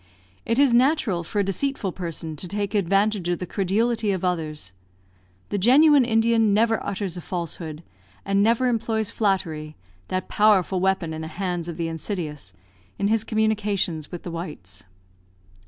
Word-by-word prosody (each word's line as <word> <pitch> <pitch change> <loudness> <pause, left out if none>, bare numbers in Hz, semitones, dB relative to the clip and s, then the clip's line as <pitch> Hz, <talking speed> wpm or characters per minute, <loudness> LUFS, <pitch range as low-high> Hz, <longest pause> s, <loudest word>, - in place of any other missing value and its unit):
It 230 - +1
is 275 -3 +5
natural 240 - +2
for 205 +5 -1
a - - +1
deceitful 200 +1 -1
person 165 -3 -5
to 180 - -6
take 200 +2 -3
advantage 200 -1 +1
of 175 - +1
the 180 - -5
credulity 215 +4 0
of 185 -1 -2
others. 155 - -3 0.8
The 205 - -1
genuine 275 +5 +6
Indian 225 -2 +3
never 225 +1 +2
utters 190 -3 -3
a - - -5
falsehood, 170 -2 -5 0.4
and 195 0 +2
never 230 +4 +3
employs 225 -2 -1
flattery 165 -7 -1 0.3
(that 185 0 -3
powerful 200 -3 +3
weapon 190 -3 0
in 160 - -5
the 160 - -5
hands 175 0 -3
of 170 -2 -6
the 165 -1 -2
insidious), 160 - -5 0.5
in 200 - 0
his 220 -1 +2
communications 210 -8 -1
with 175 - -7
the 175 - -6
whites. 105 - -7
195 Hz, 155 wpm, -24 LUFS, 170-220 Hz, 0.8 s, genuine